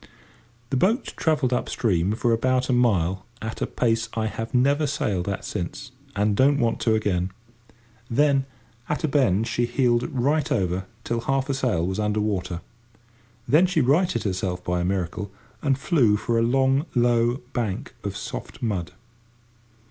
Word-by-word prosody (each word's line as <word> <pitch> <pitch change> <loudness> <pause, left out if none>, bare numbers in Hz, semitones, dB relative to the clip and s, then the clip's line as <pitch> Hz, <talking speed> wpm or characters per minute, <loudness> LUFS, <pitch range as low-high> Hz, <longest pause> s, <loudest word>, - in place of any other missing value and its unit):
The 135 - +2
boat 220 - +1
travelled 150 -6 +1
up 125 - -1
stream 95 -3 +1
for 115 +1 +1
about 130 +3 +1
a - - +3
mile 95 -7 +2 0.2
at 110 0 -6
a - - 0
pace 115 -1 0
I 110 -1 0
have 115 +1 -4
never 140 +4 +3
sailed 100 -9 -1
at 100 - -4
since, 125 +10 -5 0.2
and 105 0 +2
don't 140 +5 +4
want 115 -4 +1
to 110 -2 +2
again. 95 -4 0 0.8
Then, 140 +2 +3 0.4
at 150 - -1
a - - +3
bend, 125 -8 +2
she 120 0 0
heeled 120 -1 +2 0.5
over 95 -5 0 0.2
till 120 - -1
half 135 +3 -1
her - - +2
sail 120 -11 0
was 95 +3 -2
under 105 0 0
water. 95 -4 -2 0.9
Then 165 +6 +5
she 170 -3 +1
righted 165 +8 +2
herself 95 -2 -2
by 90 0 -1
a - - -1
miracle 95 +1 -2 0.3
and 135 -3 +2
flew 135 -8 +3
for 115 +2 0
a - - +2
long 135 +5 +2
low 120 +1 +2
bank 110 -6 -3
of - - -4
soft - - -7
mud. 95 -7 -2
115 Hz, 165 wpm, -24 LUFS, 100-135 Hz, 0.9 s, Then